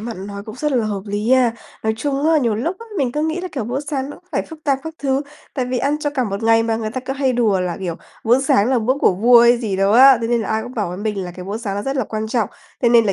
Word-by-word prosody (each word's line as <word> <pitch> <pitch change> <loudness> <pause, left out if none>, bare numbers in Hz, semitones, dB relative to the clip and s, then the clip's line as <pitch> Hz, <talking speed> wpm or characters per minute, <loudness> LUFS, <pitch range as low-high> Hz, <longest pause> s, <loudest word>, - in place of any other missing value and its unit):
bạn 220 -4 -6
nói 200 0 -7
cũng 215 +1 -9
rất 300 +2 -1
là 240 -4 +1
hợp 200 -2 -3
lý 205 +4 -2
a! 255 -3 +4 0.3
Nói 220 0 0
chung 280 +4 -1
á, 320 -1 +4
nhiều 235 -6 +1
lúc 325 - -2
á, 460 - -11
mình 255 -3 0
cứ 300 - -1
nghĩ 320 +3 -1
là, 370 - -5
kiểu, 260 -7 -3
bữa 245 +5 -2
sáng 285 -2 -3
nó - - -9
cũng 365 - -24
phải - - 0
phức 320 -1 -13
tạp 275 -2 +2
các 320 0 -6
thứ, 270 0 0 0.3
tại 260 - -1
vì 250 0 -2
ăn 285 +4 0
cho 290 - -1
cả 265 -4 -1
một 200 0 -4
ngày 225 0 +4
mà 225 -1 0
người 220 -1 -3
ta 255 - -4
cứ 265 +1 -4
hay 270 -1 0
đùa 220 -6 +2
là, 180 -1 -2
kiểu, 175 -3 -3 0.3
bữa 240 +4 +4
sáng 265 -5 +3
là 260 - +3
bữa 235 +3 +1
của - - +4
vua 235 +5 +6
hay 240 +1 +6
gì 215 -5 -2
đó 195 +2 +2
á, 260 +1 +8
thế 230 - -1
nên 240 -1 +2
là 215 - -4
ai 220 0 0
cũng 245 +2 -9
bảo 210 -5 -1
với 180 - -6
mình 205 -3 -2
là 175 - -6
cái 180 - -7
bữa 200 +3 -4
sáng 205 -4 -4
nó 205 - -2
rất 270 +3 -2
là 260 - 0
quan 215 +1 -4
trọng. 220 -3 0 0.3
Thế 240 - +5
nên 235 -1 +5
là 195 - +1
235 Hz, 335 wpm, -19 LUFS, 215-270 Hz, 0.3 s, á